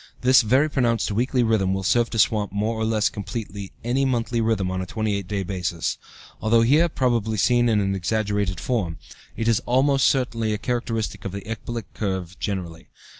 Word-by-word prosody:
This 130 +1 +6
very 130 +7 +3
pronounced 120 -7 0
weekly 125 +4 +1
rhythm 100 -4 +1
will 95 - -3
serve 120 +5 +2
to 115 - -4
swamp 105 -1 +2
more 105 +3 -1
or 110 0 -1
less 110 -1 +2
completely 100 -2 -6
any 125 +4 +1
monthly 120 -2 0
rhythm 105 -5 0
on 95 0 -2
a 95 - -5
28 105 -3 -2
day 100 -1 -2
basis. 90 -3 -3 0.4
Although 115 +1 +4
here 150 +8 +4
probably 115 -6 0
seen 120 +3 +3
in 110 -2 +3
an 95 -1 0
exaggerated 100 -1 -1
form, 100 -10 -2 0.4
it 115 - -1
is 115 -3 +3
almost 135 +2 +3
certainly 115 -5 0
a - - -3
characteristic 115 -2 -3
of 100 - -4
the 100 - -5
ecbolic 115 0 -5
curve 95 -4 -3
generally. 85 -5 -4
110 Hz, 180 wpm, -23 LUFS, 100-120 Hz, 0.4 s, This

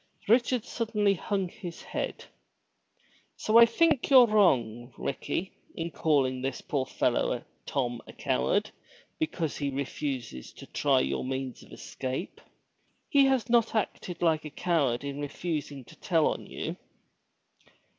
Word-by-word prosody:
Richard 240 +1 +3
suddenly 210 -5 +1
hung 195 +1 -2
his 175 -1 -9
head. - - -4 1.1
"So 220 +2 +5
I 235 - +9
think 305 +3 +2
you're 260 -3 +9
wrong, 125 - +2
Ricky, 175 +6 -3 0.2
in 170 +1 -4
calling 135 -6 +1
this 135 0 -2
poor 135 -3 -2
fellow 120 -1 0 0.2
Tom 120 -4 -1
a - - -10
coward 65 +1 0 0.5
because 160 0 -2
he 140 -1 -1
refuses 130 - -4
to - - -11
try - - +2
your 65 +1 -1
means 130 -1 -4
of - - -17
escape. 130 +6 -5 0.7
He 280 -3 +6
has 265 -5 +2
not 235 -1 +3
acted 180 -5 -2
like 160 -2 +2
a 155 - -6
coward 145 -7 0
in 140 0 -5
refusing 145 -2 -4
to - - -15
tell 165 -4 +1
on - - -1
you." - - -5
155 Hz, 135 wpm, -28 LUFS, 130-210 Hz, 1.1 s, I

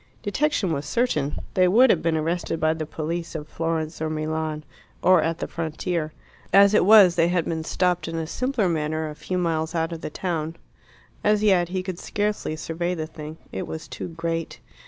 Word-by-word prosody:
Detection 210 - 0
was 140 -1 -3
certain: 150 - 0 0.2
they 185 -1 +4
would 235 +6 +6
have 165 - +1
been 165 -1 +1
arrested 165 +1 -1
by 155 0 +2
the 160 -1 -5
police 165 +2 -4
of 150 -1 -5
Florence 165 -1 -3
or 160 - 0
Milan, 155 0 -2 0.4
or 185 -2 +6
at 165 0 -1
the - - -3
frontier. 165 0 -3 0.4
As 200 +1 +7
it 210 - +4
was, 200 -4 +8
they 170 -1 +3
had 175 -1 +1
been 160 -1 -2
stopped 180 +1 0
in 165 - -4
a 165 -1 -2
simpler 255 - 0
manner 155 -1 -1
a - - -9
few 180 +4 -3
miles 165 -1 -1
out 165 0 0
of 165 -1 -6
the - - -4
town. 165 -1 -3 0.7
As 210 0 +3
yet 185 -5 +4
he 185 0 -2
could 185 -2 -5
scarcely 205 -6 -2
survey 170 +3 -3
the 160 -2 -3
thing. 155 0 -9
It - - -4
was 160 - -6
too - - -6
great. 165 -1 -4
165 Hz, 200 wpm, -24 LUFS, 155-185 Hz, 0.7 s, was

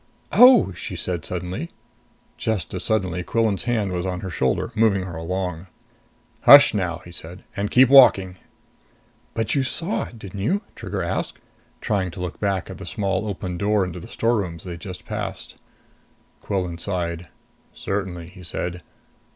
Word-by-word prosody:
"Oh!" 245 - +7
she 90 +1 -6
said 85 -1 -3
suddenly. 90 - -4 0.7
Just 110 -6 -2
as 95 - -4
suddenly, 95 -6 0
Quillan's 110 +1 0
hand 110 -6 0
was 90 -1 -2
on 90 -1 -3
her 95 - -5
shoulder, 65 - 0
moving 110 -4 +2
her 90 -3 -7
along. 90 +1 -4 0.8
"Hush 140 0 +10
now," 90 -5 -2
he 85 - -11
said. 85 +2 -6
"And 100 +1 -2
keep 130 +1 +6
walking." 100 -9 +6 1.0
"But 115 -2 0
you 140 - +2
saw 165 +8 -1
it, 120 - -12
didn't 100 -2 -8
you?" 185 - 0
Trigger - - -4
asked, - - -3 0.4
trying 95 -3 0
to 85 - -10
look 90 -1 -5
back 100 -3 0
to - - -8
the - - -10
small 100 0 -1
open 90 -3 -4
door 105 -1 +2
into 90 0 -6
the 85 - -10
storerooms 100 -9 -1
they'd 85 -2 -7
just 90 +1 -9
passed. - - -5 0.8
Quillan 90 -4 -3
sighed. 85 -2 -3 0.4
"Certainly," 90 -4 -4
he 90 0 -14
said. 90 0 -4
95 Hz, 160 wpm, -23 LUFS, 90-110 Hz, 1.0 s, Hush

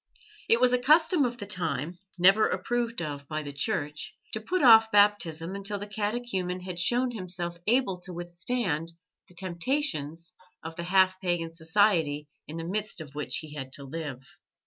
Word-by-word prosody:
It 230 - +5
was 250 0 +4
a 250 - +3
custom 315 +3 +4
of 240 0 -3
the 205 - -6
time 170 -4 -2 0.2
never 195 +5 +6
approved 235 -5 -1
of 145 -2 -6
by 155 +1 -3
the 145 -1 -7
Church 150 -1 -2 0.2
to 220 - -2
put 360 +8 -1
off 225 -3 +8
Baptism 195 -5 +3
until 200 +1 -3
the 200 - -6
catechumen 205 -4 -2
had 180 -1 -6
shown 245 +8 +2
himself 175 -5 -4
able 225 -6 +2
to 180 +1 -9
withstand 170 -1 -2 0.3
the 180 - -19
temptations 170 - -2 0.3
of 160 0 -7
the 170 - -5
half 185 0 +3
pagan 175 -3 -1
society 160 -3 +2 0.2
in 155 - -7
the 165 - -4
midst 205 +2 -3
of 150 -3 -9
which 145 -4 -1
he 155 -2 -10
had 135 -3 -6
to 140 - -6
live. 135 -3 -6
180 Hz, 170 wpm, -28 LUFS, 160-215 Hz, 0.3 s, off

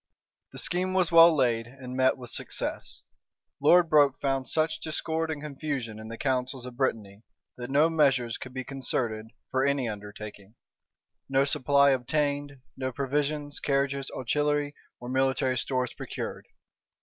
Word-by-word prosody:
The - - -10
scheme 185 +1 0
was 180 -3 +2
well 165 0 +9
laid, 120 -6 +1
and 130 0 -9
met 130 0 +3
with 125 -2 -7
success. - - -4 0.6
Lord 170 +4 +6
Broke 145 -4 +4
found 135 -2 -1
such 155 0 0
discord 160 +1 -2
and 150 -2 -4
confusion 140 -7 -4
in 110 - -8
the 115 +1 -7
counsels 130 -1 -1
of 125 -1 -8
Brittany, 110 -6 -2 0.4
that 120 0 -6
no 145 +4 +4
measures 135 -7 +2
could 130 - -8
be 130 0 -4
concerted 120 -4 -2 0.2
for 130 0 +1
any 140 -2 +1
undertaking; 105 0 -8 0.7
no 135 0 +3
supply 140 -1 +4
obtained; 145 +1 -1
no 130 0 -3
provisions, 145 +2 -2
carriages, 140 -1 0
artillery, 145 +3 0 0.3
or 120 - -8
military 130 0 +1
stores 130 0 -1
procured. - - -6
135 Hz, 145 wpm, -28 LUFS, 125-145 Hz, 0.7 s, well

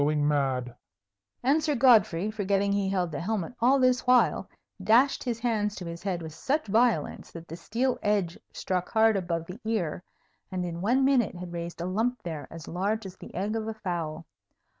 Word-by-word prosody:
I - - +4
think - - +2
I 155 - +2
am - - -1
going 145 - +2
mad!" 130 -4 0 0.7
And 290 +5 +3
Sir 300 -2 +1
Godfrey, 215 -7 +4
forgetting 200 -1 0
he 200 -1 +1
held 180 -3 0
the 145 - -4
helmet 200 +1 -2
all 255 +4 +4
this 255 0 +2
while, 250 0 +3 0.3
dashed 235 +7 +4
his 235 -2 -2
hands 210 -4 0
to 180 - -7
his 170 0 -6
head 180 -4 -2
with 160 -1 -7
such 290 - -1
violence 220 -5 +1
that 165 0 -9
the 165 - -7
steel 240 +9 -1
edge 200 -5 0
struck 180 -1 -2
hard 220 0 +4
above 170 -3 -2
the 180 +6 -9
ear, 215 -8 -1 0.5
and 180 -1 -2
in 170 -1 -5
one 250 +7 +3
minute 255 -8 +2
had 175 0 -7
raised 170 0 -5
a - - -2
lump 225 +7 -1
there 155 -5 -5
as 165 -2 -10
large 200 +5 -1
as 185 - -8
the - - -12
egg 200 +5 -1
of 220 -1 -2
a 220 - -4
fowl. 170 -6 -4
195 Hz, 210 wpm, -28 LUFS, 170-225 Hz, 0.7 s, I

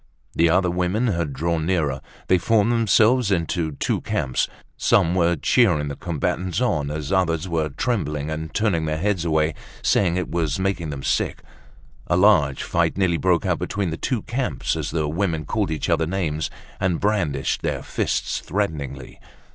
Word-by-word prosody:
The 85 0 +3
other 90 +1 +3
women 90 +7 0
had 85 -6 -1
drawn 80 +3 -1
nearer. 80 -8 0 0.2
They 95 - +3
formed 110 +3 +2
themselves 115 +1 +3
into 85 -3 0
two - - -1
camps. 65 -2 -1 0.3
Some 85 - +3
were 85 -1 +3
cheering 80 - +2
the 70 - -4
combatants 85 +4 -2
on 75 - 0
as 75 -1 -4
the 95 - +3
others 85 -2 0
were 80 -3 -1
trembling 75 - -2
and 80 0 -4
turning 95 -8 +1
their 75 0 -1
heads 95 0 0
away 80 -1 +2 0.3
saying 90 -4 +2
that 90 - +1
it 90 - -7
was 80 -4 0
making 95 -4 -1
them 70 -2 -5
sick. - - -1 0.6
A 85 - +2
large 90 -9 +4
fight 85 0 0
nearly 90 -4 +2
broke 90 -2 +2
out - - +1
between 95 -4 -2
the - - -2
two 120 +6 -2
camps 130 +2 -2
as - - -3
the 80 -2 -1
women 80 -1 -1
called 105 +3 -1
each 80 -2 -2
other 80 -2 +1
names 80 -4 -2 0.3
and 90 -3 0
brandished 95 -10 0
their - - -2
fists - - -1
threateningly. 75 -9 -4
85 Hz, 175 wpm, -23 LUFS, 75-95 Hz, 0.6 s, large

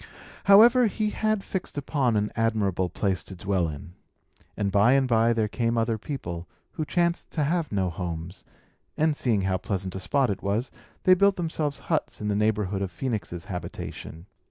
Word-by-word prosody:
However, 230 +5 +7
he 210 +1 -1
had 215 -2 0
fixed 185 -5 -5
upon 135 -5 +1
an 105 0 0
admirable 100 -5 0
place 95 +1 -1
to 95 - -8
dwell 95 -2 0
in. 75 +3 -9 0.6
And 100 -2 0
by 105 +5 +5
and 135 -1 +3
by 115 -1 +3
there 110 -2 +1
came 115 +2 -1
other 115 -1 0
people, 85 - -5 0.2
who 160 -4 -3
chanced 170 +1 0
to 155 - 0
have 165 +1 0
no 95 -3 0
homes; 85 +1 -6 0.5
and, 155 -1 +2
seeing 115 -8 +1
how 95 -1 0
pleasant 95 -1 -3
a 95 - -4
spot 135 +3 +1
it 95 - -4
was, 105 +6 -1 0.3
they 185 - +7
built 200 +1 +4
themselves 160 -4 -2
huts 160 -3 -2
in 105 - -2
the 100 - +1
neighbourhood 105 -2 0
of 95 -2 -2
Phœnix's 95 -4 -4
habitation. 90 -2 -7
110 Hz, 180 wpm, -26 LUFS, 95-150 Hz, 0.6 s, However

